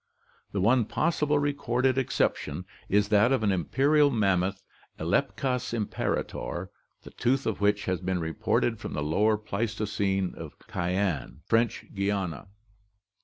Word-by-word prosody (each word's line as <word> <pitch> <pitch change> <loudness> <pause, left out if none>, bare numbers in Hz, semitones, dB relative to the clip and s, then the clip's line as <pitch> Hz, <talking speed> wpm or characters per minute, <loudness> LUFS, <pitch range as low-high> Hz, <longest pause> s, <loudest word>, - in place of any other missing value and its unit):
The 100 - -1
one 115 +3 +4
possible 150 +3 +1
recorded 135 -3 +1
exception 130 - -1 0.2
is 105 +1 +3
that 105 +4 +4
of 130 -4 +2
an 100 - +3
imperial 140 - +3
mammoth 95 -6 +1 0.4
(Elepkas 125 - 0
imperator), 95 -4 -3 0.3
the - - -11
tooth 135 +3 0
of 110 -2 -2
which 105 0 +2
has 95 -3 -1
been 95 -1 -1
reported 85 +7 0
from - - -6
the 75 - -2
Lower 105 +8 +2
Pleistocene 100 -3 -1
of - - -9
Cayenne, 90 - -2
French 115 0 +1
Guiana. 100 -5 -2
105 Hz, 125 wpm, -28 LUFS, 95-125 Hz, 0.4 s, one